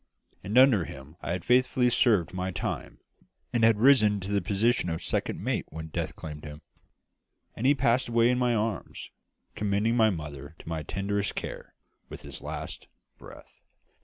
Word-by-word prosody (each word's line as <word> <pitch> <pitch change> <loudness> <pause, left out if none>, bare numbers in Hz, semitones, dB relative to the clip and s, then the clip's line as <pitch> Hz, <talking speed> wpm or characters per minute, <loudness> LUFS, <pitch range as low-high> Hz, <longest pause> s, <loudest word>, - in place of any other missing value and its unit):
And 105 +6 -1
under 130 -9 +6
him 70 +3 -11
I - - -5
had 90 - -4
faithfully 125 0 +3
served 110 - +3
my 90 0 -2
time, 90 -1 -5 0.5
and 120 -2 +1
had 115 -1 +5
risen 110 -4 +5
to 95 +2 -5
the 100 -1 +1
position 105 +2 +1
of 80 -1 -3
second - - -2
mate - - -1
when 80 +1 -7
death - - -3
claimed 75 -1 -8
him, 75 -1 -9 0.9
and 125 - 0
he 145 - +5
passed 125 -1 +2
away 120 0 +3
in 125 - 0
my 125 -1 +2
arms, 110 -3 -3 0.4
commending 105 +3 0
my 110 -2 +5
mother 75 -4 -6
to - - -15
my 80 -1 -3
tenderest 100 +5 -2
care - - -7 0.3
with - - -9
his - - -8
last - - -7 0.3
breath. - - -14
105 Hz, 170 wpm, -28 LUFS, 85-120 Hz, 0.9 s, under